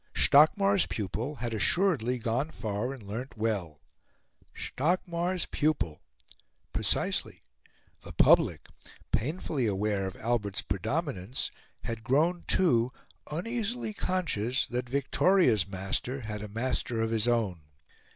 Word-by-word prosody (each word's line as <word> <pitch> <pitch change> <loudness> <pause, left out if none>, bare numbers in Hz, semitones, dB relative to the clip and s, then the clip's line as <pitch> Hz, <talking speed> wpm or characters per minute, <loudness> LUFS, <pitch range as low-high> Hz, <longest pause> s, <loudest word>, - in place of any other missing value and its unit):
Stockmar's 195 +7 +5
pupil 110 - -3
had 120 -2 -3
assuredly 125 - +2
gone 120 +5 -1
far 110 -2 -3
and 135 -5 -9
learnt 115 +6 -6
well. 100 -9 -2 0.8
Stockmar's 175 +3 -1
pupil! 145 - -1 0.7
precisely; - - -1 0.6
the - - -8
public, - - +4 0.5
painfully 145 - 0
aware 100 -1 0
of 95 - -7
Albert's 110 -4 -1
predominance, 120 - -2 0.3
had 115 -1 -4
grown, 160 +9 +2
too, 125 -10 +3 0.4
uneasily 225 +7 -2
conscious 135 - 0
that 125 0 -3
Victoria's 140 - +3
master 100 +7 -3
had 105 -2 -5
a 105 - -5
master 115 +1 -1
of 115 0 0
his 115 0 +1
own. 110 -8 +1
120 Hz, 110 wpm, -29 LUFS, 105-155 Hz, 0.8 s, Stockmar's